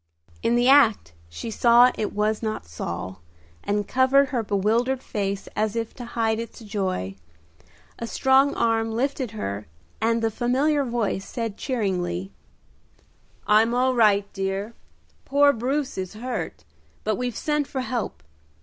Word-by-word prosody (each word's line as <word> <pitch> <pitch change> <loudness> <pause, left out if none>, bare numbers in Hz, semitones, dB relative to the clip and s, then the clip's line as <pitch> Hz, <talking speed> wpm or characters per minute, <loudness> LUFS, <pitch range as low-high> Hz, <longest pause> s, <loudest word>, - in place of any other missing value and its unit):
In 235 - +2
the 240 +1 +3
act 235 - +5 0.2
she 85 - -6
saw 240 +2 +6
it 210 - -3
was 210 +1 0
not 215 - -3
Saul, 85 +2 -6 0.4
and 205 0 -1
covered 265 +2 +4
her 250 -3 0
bewildered 225 +6 0
face 200 -2 -3
as 215 +1 0
if 230 -1 -3
to 245 - -9
hide 225 -1 +1
its 230 0 -7
joy. 190 - -3 0.8
A 230 - -4
strong 265 +3 +3
arm 225 -1 +1
lifted 255 +2 -1
her, 100 - -4 0.3
and 230 +1 +1
the 225 - +1
familiar 275 +6 +1
voice 230 -6 -2
said 230 -4 -3
cheeringly, 190 -7 -2 1.1
"I'm 220 +3 +4
all 255 +1 +2
right, 210 -4 +4
dear. 195 +3 -3 0.5
Poor 285 +1 +4
Bruce 265 +1 -2
is 185 +2 -5
hurt, 245 +3 -5 0.4
but 215 - 0
we've 245 0 -3
sent 300 -2 0
for 265 - -3
help. 230 - -4
225 Hz, 140 wpm, -24 LUFS, 205-255 Hz, 1.1 s, saw